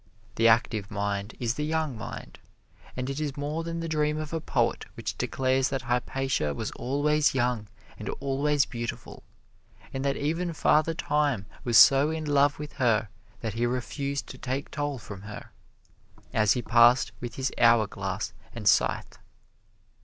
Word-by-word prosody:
The 115 +2 +3
active 110 -3 +2
mind 100 0 -3
is 120 -2 0
the 150 - -3
young 155 -3 -1
mind, 115 - -8 0.6
and 125 0 -2
it 135 +2 -3
is 145 -2 -3
more 150 +3 -2
than 165 0 -4
the 165 - -3
dream 150 -1 0
of 155 0 -5
a 165 - -1
poet - - 0
which - - -4
declares 130 0 +1
that 135 -3 -3
Hypatia 125 - -1
was 110 - -4
always 145 +4 +1
young 120 -4 0 0.3
and - - -5
always 140 +1 +1
beautiful, 120 -1 -6 0.7
and 135 - -3
that 140 0 0
even 165 +4 -1
Father 155 +1 +2
Time 145 - 0 0.2
was 120 -2 +3
so 135 +7 +8
in 160 -1 -3
love 145 -1 +3
with 150 0 -7
her 110 -3 +2 0.3
that 110 -3 -3
he 120 +2 0
refused 140 +3 -3
to 130 - -9
take 135 +3 -3
toll 145 -2 -2
from 100 -4 -9
her, 105 +1 -9 0.8
as 105 -2 +4
he 125 - -3
passed 120 +1 +5
with 120 -1 -5
his 130 0 -1
hourglass 115 -3 +2 0.2
and - - -4
scythe. - - +2
135 Hz, 160 wpm, -27 LUFS, 115-150 Hz, 0.8 s, so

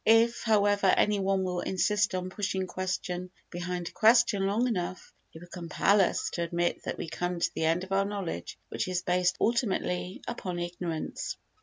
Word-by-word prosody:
If, 225 +1 +4
however, 205 -3 +3
any 205 +2 +4
one 195 0 +1
will 180 -1 -1
insist 205 +2 +1
on 185 0 -3
pushing 190 -1 -1
question 185 -1 -3 0.2
behind 175 0 -4
question 215 -3 +4
long 220 +5 +2
enough, 185 -5 -3 0.2
he - - -13
will 170 - -11
compel 175 +3 +2
us 185 - +1
to 170 - -3
admit 170 +1 0
that - - -3
we - - -4
come 175 +1 -3
to - - +1
the 160 - -1
end 165 +3 +2
of 190 - -9
our 195 0 +3
knowledge 195 - -4
which - - -2
is 185 0 -1
based 180 0 +2
ultimately 195 -5 0
upon 185 -7 -4
ignorance. 175 -2 -4
185 Hz, 175 wpm, -29 LUFS, 175-205 Hz, 0.2 s, If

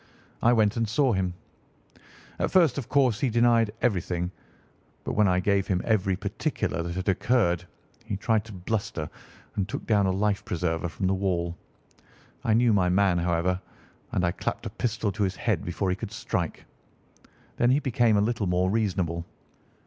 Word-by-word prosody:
I 120 - +5
went 110 -2 +3
and 115 -2 0
saw 130 +2 +2
him. 95 -2 -1 1.0
At - - +1
first, 170 -6 +4
of 125 - -7
course, 130 -6 +3
he 135 - +1
denied 115 -1 +3
everything. 90 -5 0 0.7
But - - -3
when 105 -1 +4
I 90 -1 +3
gave 100 +1 +1
him 90 -2 +1
every 100 -4 +2
particular 100 - -2
that 85 +1 -4
had 95 +1 -4
occurred, 100 -3 +2 0.4
he 110 -3 -4
tried 110 +1 +1
to 110 - -10
bluster 100 -3 -3 0.5
and 100 0 -1
took - - -5
down 105 -3 +3
a - - +2
life 100 +1 0
preserver 85 -1 -2
from 95 - -4
the 95 - +2
wall. 90 -3 -1 0.9
I 110 - +3
knew 120 -1 +4
my 90 -3 +3
man, 95 -1 +3
however, 90 +2 0 0.5
and 90 - +1
I 85 - +2
clapped - - -4
a - - -4
pistol 110 -3 -1
to 105 +3 -5
his 95 -1 +1
head 105 -6 -1
before 90 +2 -1
he - - 0
could - - -6
strike. - - -3 0.9
Then 120 - +3
he 135 +3 +4
became 120 -5 +2
a - - +3
little 110 -1 0
more 90 +1 +1
reasonable. 95 -6 0
100 Hz, 180 wpm, -27 LUFS, 90-115 Hz, 1.0 s, I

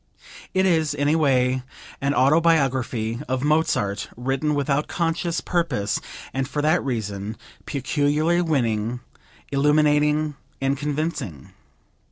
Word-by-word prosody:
It 190 0 +3
is, 160 -5 +2
in 145 0 +1
a 155 - +3
way, 130 -4 +2 0.4
an 140 +1 +1
autobiography 130 -6 +2
of 130 0 -1
Mozart 145 -10 +1
written 135 +4 0
without 145 +1 0
conscious 170 0 -1
purpose, 150 - 0 0.3
and 135 0 -1
for 145 - -4
that 155 +3 +3
reason 110 -5 -3 0.3
peculiarly 150 +4 +1
winning, 120 -7 0 0.5
illuminating 150 +1 +2 0.2
and 135 +1 +1
convincing. 145 - -3
145 Hz, 110 wpm, -23 LUFS, 125-155 Hz, 0.5 s, It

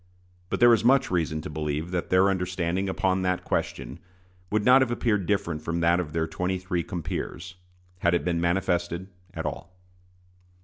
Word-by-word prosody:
But - - -2
there 120 0 +7
is 115 - +2
much 135 0 +4
reason 80 -3 0
to - - -7
believe 75 +2 -3
that 90 -2 -2
their 95 +1 +4
understanding 90 0 -1
upon 95 0 0
that 90 -1 0
question - - -3 0.5
would 105 0 0
not 130 +1 +7
have 130 - +2
appeared 105 -5 0
different 95 -7 -1
from 85 +1 -2
that 85 +1 +3
of 80 -4 -3
their 80 0 0
twenty 90 +3 -2
three 90 -1 -2
compeers, 85 +1 -5 0.5
had 85 0 +2
it - - -1
been 85 -1 0
manifested 85 0 0 0.3
at - - -4
all. 85 - -5
90 Hz, 175 wpm, -26 LUFS, 85-95 Hz, 0.5 s, there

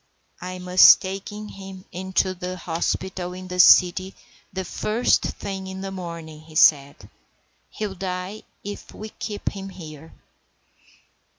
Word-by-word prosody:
"I 185 0 -5
must 180 0 +7
take 190 +1 -5
him 195 -2 -9
in 190 +1 -7
to 185 0 +2
the 185 0 -5
hospital 180 +1 -3
in 185 0 -8
the 180 0 -5
city 185 +1 +6 0.4
the 190 0 -4
first 220 +6 +1
thing 190 -1 -5
in 190 0 -6
the 195 0 -5
morning," 170 -4 -8
said 140 -2 +5
he. - - -15 0.6
"He'll 210 -2 -4
die 185 +2 -5 0.2
if 205 0 -8
we 215 +1 -7
keep 210 -1 -4
him 195 -1 -7
here." 160 -4 -11
185 Hz, 135 wpm, -24 LUFS, 180-195 Hz, 0.6 s, must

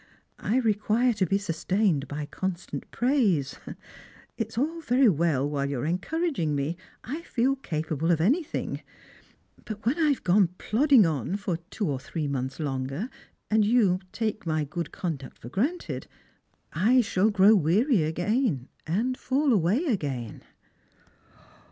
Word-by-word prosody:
I 230 - 0
require 225 +1 +2
to 200 -4 0
be 195 - +2
sustained 185 -3 0
by 150 +1 -4
constant 185 +3 -5
praise. 220 - +1 0.8
It 225 - -2
is 220 - -14
vU 315 +7 -1
very 255 -3 +4
well 155 -5 +1
while 140 -1 -1
you 140 -3 -2
are 120 - -2
encouraging 185 - -1
me, 145 +4 -1 0.3
I 290 +8 -5
feel 270 -4 +1
capable 160 - -2
of 170 -2 +3
anything; 280 - 0 0.8
but 215 -1 -7
when 270 +9 +1
I 310 -2 +4
have 280 - 0
gone 185 0 +4
plodding 255 0 +4
on 160 - -1
for 200 -4 -2
two 205 -2 -2
or 140 -3 -1
three 150 +3 -4
months 135 0 -3
longer, 135 - -3 0.4
and 215 0 +4
yea 205 -5 +3
take 215 -4 -3
my 155 -1 +1
good 155 +3 -5
conduct 150 -7 -5
for 120 - -10
granted, 275 - -2 0.7
I 240 +8 +4
shall 205 -1 +2
grow 205 0 +6
weary 205 - +3
again, 175 - 0 0.2
and 225 +10 0
fall 270 +1 +1
away 205 - +2
again." 140 - -2
195 Hz, 145 wpm, -27 LUFS, 155-240 Hz, 0.8 s, grow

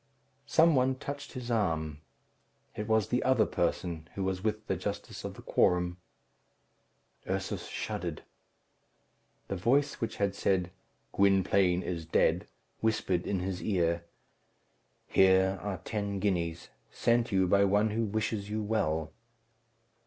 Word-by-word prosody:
Some 165 +1 +5
one 130 -1 +3
touched 140 +2 -7
his 125 -2 -5
arm. 80 -9 0 0.7
It 105 - -4
was 110 -2 +2
the 125 - +1
other 130 -4 +3
person, 85 -3 -2
who 95 - -2
was 95 0 -2
with 110 0 -1
the - - -1
justice - - -5
of - - -5
the - - -12
quorum. 90 0 +2 1.3
Ursus 95 0 -2
shuddered. - - -4 1.2
The 100 - -3
voice 135 +10 +1
which 115 - -2
had 100 -1 0
said, 95 -3 0 0.4
"Gwynplaine 95 -2 +3
is 85 -3 -4
dead," - - +2 0.3
whispered 100 -5 0
in 95 -3 0
his 95 0 -3
ear, 85 -4 +1 1.0
"Here 95 0 +4
are 100 -2 -3
ten 100 -1 -3
guineas, 85 -4 -1 0.2
sent 120 0 +1
you 95 -1 +3
by 100 +2 +4
one 105 +2 +3
who 115 +2 0
wishes 105 -1 -2
you 110 0 -2
well." 80 -8 -1
100 Hz, 130 wpm, -30 LUFS, 90-110 Hz, 1.3 s, Some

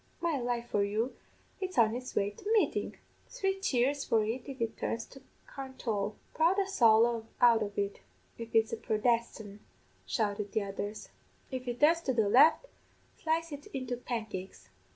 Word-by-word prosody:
'My 335 -4 0
life 240 -1 -2
for 205 - +2
you, 215 +5 -1 0.4
it's 375 -1 -4
on 225 -2 +5
it's 250 +1 -6
way 200 0 +1
to 415 - -3
Meeting. 440 - +1 0.3
Three 385 0 -1
cheers 275 -4 +1
for 225 -1 +2
it 245 +5 -4
if 270 - -7
it 230 -1 -2
turns 230 0 -3
to 270 - -15 0.3
Carntaul.' 230 -7 -4 0.2
'Prod 335 +5 +3
the 395 - +2
sowl 230 - +4
out 235 -2 +6
of 205 -1 -4
it, 200 0 -1 0.4
if 230 -1 -8
it's 225 0 +3
a - - -1
Prodestan',' 220 -2 -1 0.5
shouted 205 -3 -1
the 215 - +1
others; 205 +2 -5 0.4
'if 255 -1 -5
it 245 0 -3
turns 330 +3 +5
to 265 - -1
the 220 -3 +3
left, 270 - +6 0.5
slice 330 +1 -1
it 290 0 -8
into 255 -2 -2
pancakes. 215 - -6
235 Hz, 170 wpm, -31 LUFS, 215-275 Hz, 0.5 s, out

